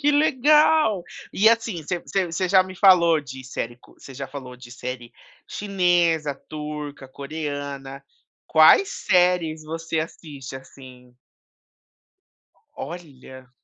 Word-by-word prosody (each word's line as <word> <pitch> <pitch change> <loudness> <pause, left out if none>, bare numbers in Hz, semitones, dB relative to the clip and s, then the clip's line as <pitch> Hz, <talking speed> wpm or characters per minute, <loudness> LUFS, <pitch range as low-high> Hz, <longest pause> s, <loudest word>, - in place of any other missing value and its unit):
Que 295 0 +3
legal. 300 - +3 0.3
E 215 +3 +5
assim, 225 -7 0
você 175 +4 -3
você 190 +1 -1
você 175 +2 -2
já 190 0 +5
me 185 0 -10
falou 170 -4 +5
de 130 -2 -10
série 120 -2 -5 0.2
você 135 - -13
já 135 +1 -6
falou 130 -2 -9
de 125 -1 -14
série 125 -1 -7 0.4
chinesa, 175 -6 +1
turca, 150 -2 -7
coreana. 140 -1 -6 0.4
Quais 160 - +6 0.2
séries 175 -3 +2
você 165 0 -3
assiste 145 -5 -8
assim? 130 -2 -15 1.6
Olha. 130 -5 -10
155 Hz, 115 wpm, -23 LUFS, 135-180 Hz, 1.6 s, Quais